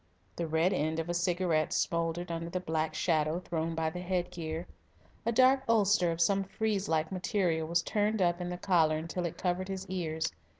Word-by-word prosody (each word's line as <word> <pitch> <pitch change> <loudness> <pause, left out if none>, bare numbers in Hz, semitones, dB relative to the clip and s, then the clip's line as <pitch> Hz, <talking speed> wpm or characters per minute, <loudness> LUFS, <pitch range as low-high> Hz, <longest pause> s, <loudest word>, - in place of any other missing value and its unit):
The 170 - -2
red 160 +4 +2
end 155 +2 0
of 165 +1 -3
a - - 0
cigarette 175 -3 +1
smouldered 170 +1 -1
under 165 0 -3
the 185 - -2
black 160 -2 -2
shadow 155 -1 +1
thrown 165 -2 -3
by 160 -1 0
the 180 - -6
headgear. 175 -2 -3 0.6
A - - +3
dark 260 +3 +5
ulster 205 -5 +4
of 165 - -4
some 195 +3 +3
frieze 205 0 -2
like 160 -1 +1
material 180 -4 0
was 170 0 +1
turned 210 +3 0
up 175 -1 +2
in 175 - -3
the 180 - -4
collar 165 -4 +3
until 170 +2 -3
it 165 - -8
covered 185 +1 -1
his 190 -1 -4
ears. 160 -4 -2
175 Hz, 195 wpm, -31 LUFS, 160-185 Hz, 0.6 s, dark